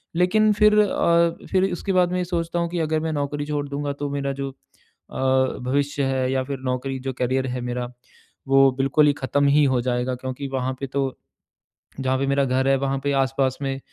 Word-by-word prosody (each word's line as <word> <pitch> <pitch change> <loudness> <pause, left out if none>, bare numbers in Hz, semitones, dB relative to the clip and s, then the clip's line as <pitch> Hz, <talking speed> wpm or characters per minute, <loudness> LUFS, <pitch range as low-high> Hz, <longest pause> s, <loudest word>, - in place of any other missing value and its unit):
लेकिन 210 +5 +3
फिर 210 +1 +4
अ, 170 -4 +2
फिर 190 0 +2
उसके 195 +2 -2
बाद 180 -1 +3
मैं 180 - 0
ये 180 - -1
सोचता 170 -1 -2
हूँ 170 0 -1
कि 175 -1 -3
अगर 155 0 0
मैं 160 -1 -2
नौकरी 145 0 -2
छोड़ 145 -1 -2
दूँगा 145 0 -3
तो 145 - -1
मेरा 140 -1 -2
जो 135 - -2
अ, - - -26 1.1
भविष्य 140 +2 -1
है 130 -1 0
या 130 -1 0
फिर 135 0 -5
नौकरी 130 +1 -3
जो 135 0 -4
करियर 130 +1 0
है 125 0 -3
मेरा 125 0 -4 0.6
वो 135 0 +6
बिल्कुल 140 +3 +3
ही 145 - +4
खत्म 145 +1 0
ही 145 +1 +4
हो 130 -2 +2
जाएगा 125 0 -1
क्योंकि 130 +2 -5
वहाँ 130 -1 -2
पे 135 - -4
तो 140 +2 -2 1.0
जहाँ 130 0 0
पर 135 - 0
मेरा 140 0 +2
घर 130 +1 +1
है 135 - +4
वहाँ 135 0 -1
पे 140 - +1
आस-पास 130 0 0
में 135 -1 -2
140 Hz, 210 wpm, -23 LUFS, 130-155 Hz, 1.1 s, वो